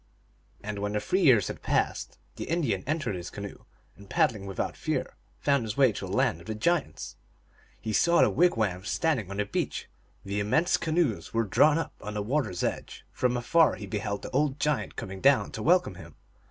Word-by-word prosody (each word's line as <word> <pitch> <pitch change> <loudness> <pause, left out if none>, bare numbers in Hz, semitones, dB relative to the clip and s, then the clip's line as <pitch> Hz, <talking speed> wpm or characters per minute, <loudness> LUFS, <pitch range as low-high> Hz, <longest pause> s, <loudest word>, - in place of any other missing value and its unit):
And 105 -1 -4
when 105 +1 -2
the 105 - +1
three 185 - 0
years 125 - +5
had - - -6
passed - - -1 0.2
the - - -5
Indian 140 - 0
entered 155 -6 -1
his 90 -1 -5
canoe, 100 -1 -8 0.3
and, 100 0 -15
paddling 115 - +1
without 95 - -3
fear, - - -3 0.2
found 140 -2 +2
his 110 -1 -5
way 135 -4 +5
to 100 - -6
the - - -7
Land 85 - +1
of 85 - -15
the 110 - -3
Giants. 170 +11 -1 0.6
He 110 -1 -4
saw 170 +9 +4
the - - +3
wig 180 +1 +4
wams 95 -3 -1
standing 145 - 0
on 100 - -6
the 105 - 0
beach; - - -3 0.4
the 100 +1 -2
immense 130 +12 +2
canoes 155 - -1
were 115 - +3
drawn 145 +9 +4
up 165 - -3
on 105 0 -6
the 105 - -1
water 130 +2 0
s 90 -1 -4
edge; - - -4
from 125 -1 0
afar 145 +6 +3
he 105 - -7
beheld 100 +1 -3
the - - -6
old 140 +1 +1
giant 140 -9 -1
coming 95 0 -6
down - - +4
to - - -6
welcome - - +3
him. - - -12
110 Hz, 205 wpm, -28 LUFS, 100-150 Hz, 0.6 s, years